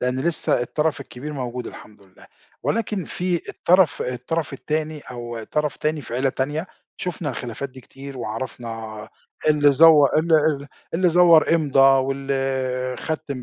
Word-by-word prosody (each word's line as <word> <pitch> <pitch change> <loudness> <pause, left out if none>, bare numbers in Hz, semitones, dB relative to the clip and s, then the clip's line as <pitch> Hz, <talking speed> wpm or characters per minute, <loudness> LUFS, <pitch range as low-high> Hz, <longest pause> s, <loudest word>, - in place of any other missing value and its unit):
لإن 125 +1 -1
لسه 160 -3 +1
الطرف 150 +4 -1
الكبير 140 +2 -8
موجود 125 -3 -5
الحمد 105 -1 -12
لله، 95 -1 -19 0.4
ولكن 210 -4 -1
في 180 -1 -2
الطرف 175 -3 +3
الطرف 125 +6 -3
التاني 155 +2 -3
أو 120 -2 -6
طرف 150 +4 -2
تاني 155 0 -2
في 115 - -7
عيلة 135 +2 +1
تانية 145 +6 -2 0.3
شُفنا 175 -4 -4
الخلافات 125 +3 -5
دي 130 0 -13
كتير، 135 +2 -10
وعرفنا 115 -2 -6 0.4
اللي 145 -1 +5
زوّ 150 0 +7
اللي 160 +1 +2
اللي 145 -2 -1 0.3
اللي 180 +2 +3
زوّر 170 -2 +6
إمضا 135 -4 +5
واللي 135 -1 -2
ختّم 150 -5 -4
140 Hz, 145 wpm, -22 LUFS, 125-155 Hz, 0.4 s, زوّ